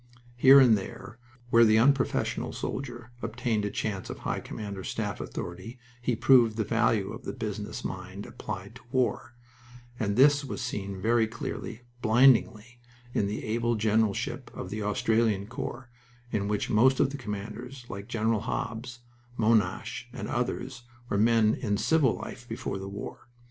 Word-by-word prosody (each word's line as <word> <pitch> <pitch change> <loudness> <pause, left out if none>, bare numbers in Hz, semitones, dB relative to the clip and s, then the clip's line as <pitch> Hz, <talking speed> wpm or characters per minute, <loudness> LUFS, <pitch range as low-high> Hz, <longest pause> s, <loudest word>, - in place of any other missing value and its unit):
Here 135 +3 +8
and 125 -5 +7
there, 110 +3 -7 0.3
where 115 0 +7
the 110 -1 +5
unprofessional 135 +3 +2
soldier 120 -3 -5
obtained 115 -2 -1
a - - -1
chance 100 -2 -3
of - - -5
high - - -2
command 105 -2 -6
or - - -6
staff - - -3
authority, 95 +8 -6 0.2
he 120 0 0
proved 115 -2 +5
the 110 - +1
value 110 -2 +1
of - - -9
the - - -4
business 105 -3 -5
mind 95 +2 -6
applied 100 0 -7
to - - -18
war, 125 -1 0 0.6
and 100 -4 0
this 145 +2 +5
was 130 - -5
seen 100 -6 -4
very 115 +2 +3
clearly 115 +1 -6 0.2
blindingly 120 0 +4 0.3
in 100 - +1
the 105 - -4
able 115 +2 0
generalship 110 -1 0
of - - -6
the 110 +1 -3
Australian 105 0 +1
Corps, 120 +2 -6 0.4
in 100 -1 -1
which 105 0 -1
most 130 +5 +4
of - - +3
the 145 - -5
commanders, 120 +3 -6
like 100 +1 -7
Generals 115 -2 0
Hobbs, 120 +1 -4 0.4
Monash, 110 0 +1
and 120 -5 -6
others, 125 +1 -3 0.3
were 100 - 0
men 110 -1 +4
in 105 -4 -1
civil 145 -1 +3
life 120 -1 -9
before 115 -3 -4
the 95 0 -6
war. 100 +4 -8
115 Hz, 160 wpm, -28 LUFS, 105-120 Hz, 0.6 s, Here